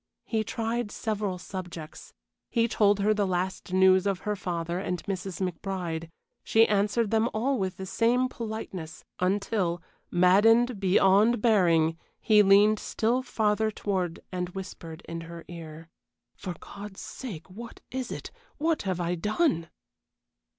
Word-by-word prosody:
He 220 -2 0
tried 230 +1 -2
several 205 -4 -2
subjects. 175 -4 -8 0.4
He 230 -1 +2
told 205 -3 +3
her 215 +2 +3
the 205 -2 0
last 185 +1 -2
news 190 +1 +5
of 195 -2 -1
her 210 0 -1
father 170 -2 -3
and 180 -2 -3
Mrs. 190 -2 -4
McBride. 170 -2 -4 0.3
She 225 +1 +4
answered 210 +2 +1
them 225 +1 +2
all 255 +3 +1
with 190 -2 -2
the 190 - -5
same 240 +6 +2
politeness, 215 -9 -6
until, 185 -2 0 0.3
maddened 210 +6 +4
beyond 195 +4 +4
bearing, 170 -7 +3 0.2
he 215 -1 +5
leaned 205 +2 +5
still 235 +3 0
farther 220 -3 +1
forward 185 -5 -2
and 180 -1 -2
whispered 175 -3 -8
in 165 0 -5
her 165 0 -9
ear: 165 -1 -9 0.5
"For 180 -3 -6
God's 200 -1 -9
sake, 195 -11 -7
what 225 +5 -10
is 260 -1 -4
it? - - -6 0.3
What 320 +1 +1
have 185 -3 -2
I 175 0 0
done?" 210 - 0
195 Hz, 140 wpm, -28 LUFS, 180-220 Hz, 0.5 s, news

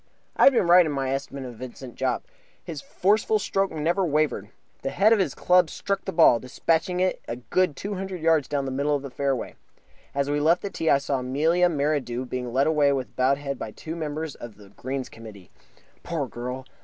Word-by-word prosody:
I - - +5
had 275 - +8
been 235 - +3
right 175 +1 +7
in 155 - -2
my 135 -2 -1
estimate 135 0 -4
of 120 -3 -9
Vincent 130 0 -9
Jopp. 130 -2 -1 0.4
His 155 -4 -6
forceful 210 +6 +1
stroke 195 -1 0
never 165 +5 0
wavered. 150 - 0 0.3
The 135 - -2
head 200 +10 +4
of 220 - +2
his 155 -10 0
club 180 -2 +4
struck 195 +4 -3
the - - -2
ball, 160 -8 +6
despatching 165 +8 0
it 185 0 0
a 115 - -3
good 145 +7 0
two 200 +8 -5
hundred 190 -1 -5
yards 160 -3 +2
down 140 -2 -1
the 135 - -3
middle 140 +3 0
of 140 - -3
the 140 - -7
fairway. 135 -2 -2 0.6
As 140 0 0
we 145 +1 0
left 165 +4 +3
the 200 - -4
tee 160 - -1
I - - +6
saw 140 -1 -2
Amelia 160 +8 +2
Merridew 140 -5 -1
being 125 -1 -4
led 135 +3 +2
away 150 -3 +3
with 135 -2 -3
bowed 130 +2 +2
head 140 -2 -5
by - - -5
two 160 +9 -7
members 155 -1 -4
of 115 -3 -10
the 100 -1 -16
Greens 130 +5 -5
Committee. 105 -5 -13 0.5
Poor 160 -6 -3
girl! 125 +3 -6
145 Hz, 215 wpm, -25 LUFS, 130-170 Hz, 0.6 s, had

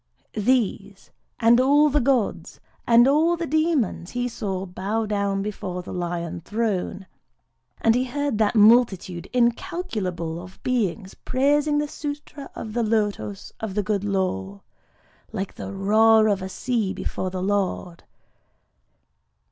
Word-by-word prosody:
These, 205 -3 -1 0.3
and 235 +2 +5
all 290 +3 +5
the 295 - +3
gods, 250 -4 0 0.3
and 235 +1 +6
all 320 +5 +3
the 335 - -2
demons, 310 - 0
he 245 0 -2
saw 195 -5 -4
bow 195 +5 -2
down 200 -2 -1
before 185 -3 -5
the - - -8
Lion 175 -1 -3
throne; 200 -2 -2 0.8
and 225 - +4
he 250 +2 +1
heard 285 -3 -2
that 215 +1 +2
multitude 210 -5 +4
incalculable 230 - -1
of 180 +1 -12
beings 215 -6 -1
praising 290 +3 +1
the 295 - +1
Sûtra 290 -1 -7
of 215 - -6
the 240 - 0
Lotos 210 -2 -2
of 215 -4 -5
the 210 - +1
Good 205 0 -1
Law,—like 185 - -5
the - - -7
roar 215 +3 +4
of 200 -2 0
a 190 - -5
sea 225 -2 -1
before 185 - -3
the 185 0 -4
Lord. 190 -3 -2
215 Hz, 130 wpm, -24 LUFS, 190-250 Hz, 0.8 s, and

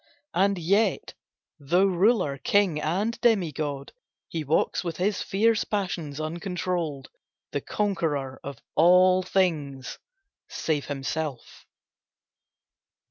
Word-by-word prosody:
And 195 +2 +2
yet, 195 +4 +1 0.5
though 175 +7 +2
ruler, 185 - +2
king 200 -9 +2
and 195 +10 -1
demi 205 -9 +3
god, 145 -2 -4 0.4
He 160 -2 -3
walks 150 +3 +1
with 170 -2 -4
his 195 +2 0
fierce 220 +2 +2
passions 170 -8 -3
uncontrolled, 170 -3 -3 0.4
The 145 - -2
conqueror 150 -11 -2
of 140 -2 -7 0.2
all 180 +3 +5
things—save 165 - -3
himself. 140 -1 -5
175 Hz, 95 wpm, -26 LUFS, 145-195 Hz, 0.5 s, all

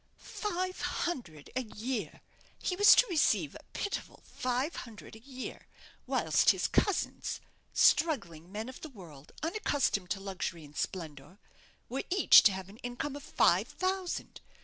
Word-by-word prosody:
Five 370 -2 -3
hundred 175 - -3
a 260 - +1
year! 220 - -4 0.4
he 365 - -2
was 410 +2 +8
to - - +6
receive 340 -6 +2
a - - -10
pitiful 405 - -4
five 255 +5 -2
hundred 225 -2 -9
a - - -12
year; 260 +1 -8 0.4
whilst - - +3
his - - +3
cousins 405 - 0 0.3
struggling 185 - +2
men 215 +3 -4
of 260 - -9
the 315 - -7
world, 165 - -13
unaccustomed 285 - 0
to 195 - -1
luxury 190 -4 -4
and 145 0 -16
splendour 160 -1 -5 0.5
were 265 +3 -2
each 380 +1 +8
to - - -3
have 190 -1 -6
an 200 +3 -14
income 245 +3 -4
of 290 - -7
five - - +3
thousand. 370 -1 -3
245 Hz, 150 wpm, -31 LUFS, -, 0.5 s, was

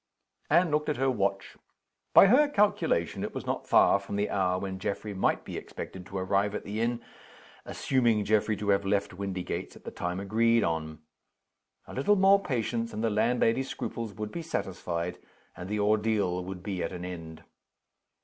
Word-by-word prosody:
Anne 170 -2 +4
looked 150 0 +1
at 150 - -1
her 135 +1 +2
watch. 100 -4 -2 0.5
By - - +9
her 260 +9 +5
calculation 210 -6 +1
it - - -5
was - - -5
not - - -3
far 100 - +5
from 100 0 -6
the 100 +1 -1
hour 90 -2 +1
when 95 0 -5
Geoffrey 100 +2 -3
might 95 - 0
be - - -6
expected 95 0 -8
to 95 - -6
arrive 100 +2 0
at - - -4
the 105 +2 -4
inn, 115 0 -1 0.6
assuming 120 -6 +1
Geoffrey 110 0 +2
to 100 +1 -3
have 100 0 +3
left 100 0 0
Windygates 95 -1 -4
at - - -15
the - - -7
time 90 +1 -3
agreed 115 +3 +2
on. 80 -1 -3 0.8
A - - -11
little 175 +11 +3
more 195 +1 +5
patience, 115 - -2
and 110 - -3
the 115 - +1
landlady's 115 +4 +1
scruples 115 -4 -5
would 105 0 -5
be 170 - -5
satisfied, 90 - -3 0.4
and 90 +2 -8
the 105 0 -1
ordeal 105 -3 +1
would 95 -1 -7
be 95 -3 -3
at 85 - -2
an 90 -1 -6
end. 80 -3 -8
105 Hz, 180 wpm, -28 LUFS, 95-115 Hz, 0.8 s, By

